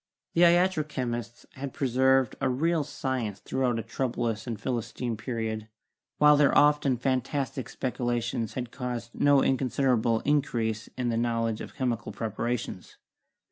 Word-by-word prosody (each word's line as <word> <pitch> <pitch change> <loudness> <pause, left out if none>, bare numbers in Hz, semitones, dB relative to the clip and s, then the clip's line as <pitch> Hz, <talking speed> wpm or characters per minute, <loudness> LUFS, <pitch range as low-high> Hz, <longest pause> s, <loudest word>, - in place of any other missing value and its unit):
The 170 - +2
iatro 175 -2 +4
chemists 120 -4 -4
had 135 0 -6
preserved 130 -2 +3
a 135 - +2
real 160 +5 +1
science 130 -8 -3
throughout 130 -3 -1
a 115 - -3
troublous 115 -2 -2
and 115 -4 -4
Philistine 120 0 -3
pe 120 +4 -7
riod, 110 -2 -3 0.5
while 150 0 +7
their 145 -1 +4
often 145 -3 +4
fantastic 130 0 -1
speculations 120 -2 -2
had 125 -2 -4
caused 120 -2 -5
no 145 -1 +4
inconsiderable 125 -3 +2
increase 115 -6 0
in 125 -1 0
the 115 - 0
knowledge 115 -2 0
of - - -9
chemical 125 -5 -2
preparations. 115 +2 -4
125 Hz, 140 wpm, -28 LUFS, 115-135 Hz, 0.5 s, while